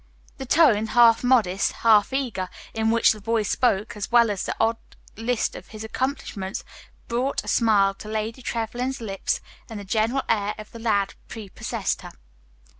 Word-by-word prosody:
The 265 - -6
tone, 240 -9 +4
half 230 0 +5
modest, 220 -7 +2
half 215 -1 +5
eager, 240 -9 -2 0.2
in 220 0 0
which 230 0 +4
the 215 - -5
boy 225 +1 0
spoke, 210 0 0
as 210 +1 -5
well 235 -2 +5
as 200 - -3
the - - -3
odd 225 +1 +2 0.4
list 230 +1 -1
of - - -10
his 215 0 -9
accomplishments, 220 -5 -3 0.4
brought 250 +4 -1
a - - -14
smile 205 -4 +3
to 195 - -11
Lady 220 +3 -3
Trevlyn's 245 +3 -3
lips, 195 -4 -2 0.3
and 220 -2 -6
the - - -7
general 225 +7 0
air 210 -1 0
of 215 0 -10
the 230 - -10
lad 200 -4 0
prepossessed 215 -4 -4
her. - - -10
225 Hz, 170 wpm, -24 LUFS, 205-240 Hz, 0.4 s, half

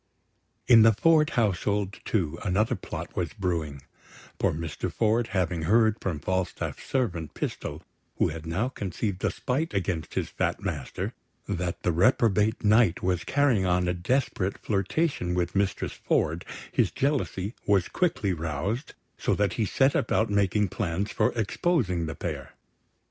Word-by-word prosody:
In 115 -2 +8
the 115 0 +7
Ford 155 +6 +4
household, 100 -2 0
too, 85 -6 -1
another 105 +3 +1
plot - - -6
was 85 -2 -2
brewing; 85 - -2 0.6
for - - +2
Master 80 -1 -4
Ford, 115 +1 +1
having 90 -3 -1
heard 110 +5 +3
from 90 -5 -2
Falstaff's 95 +4 -2
servant, 105 - -2
Pistol - - -4 0.3
(who - - +2
had 80 +1 -7
now 95 +9 0
conceived 100 -4 -4
a - - +3
spite 140 +2 -2
against 90 -4 -2
his - - 0
fat - - -1
master), - - -3 0.3
that 90 -3 -3
the 90 - +2
reprobate 105 +4 +3
Knight 105 -3 +4
was 90 -2 +1
carrying 135 -9 +2
on 90 0 +2
a 90 - +1
desperate 100 0 0
flirtation 100 - -1
with 90 +1 -1
Mistress 100 -1 0
Ford, 80 +3 0 0.3
his - - +2
jealousy 125 -8 -1
was 100 -3 +3
quickly 110 - 0
roused, 85 - -3 0.2
so - - +1
that 105 -1 +1
he 110 - 0
set 135 +7 +3
about 110 -1 +1
making 100 0 +2
plans 95 +2 -2
for - - +2
exposing 110 - 0
the 80 - -5
pair. - - -5
100 Hz, 150 wpm, -27 LUFS, 90-115 Hz, 0.6 s, In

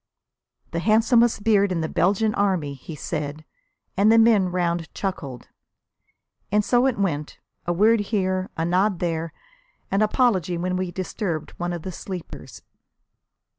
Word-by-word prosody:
"The 170 - -2
handsomest 225 +2 +3
beard 205 -3 +3
in 170 -2 -1
the 160 - -1
Belgian 205 +6 +1
Army!" 185 -9 0
he 140 +4 -9
said, 150 -1 -5 0.5
and 205 +3 +4
the 225 - +6
men 220 -5 +5
round 170 -2 -1
chuckled. 140 - -5 1.0
And 210 0 +2
so 245 +3 +3
it 260 - -1
went, 155 -7 -2 0.3
a - - +2
word 215 +6 +4
here, 190 -3 -1
a 165 - 0
nod 185 +3 +2
there, 165 -1 -2 0.6
an 195 - +2
apology 210 - +2
when 180 +2 -2
we 185 0 -2
disturbed 175 -2 -4
one 175 0 -2
of 170 -2 -5
the 190 - -5
sleepers. 180 0 -8
185 Hz, 145 wpm, -23 LUFS, 170-210 Hz, 1.0 s, the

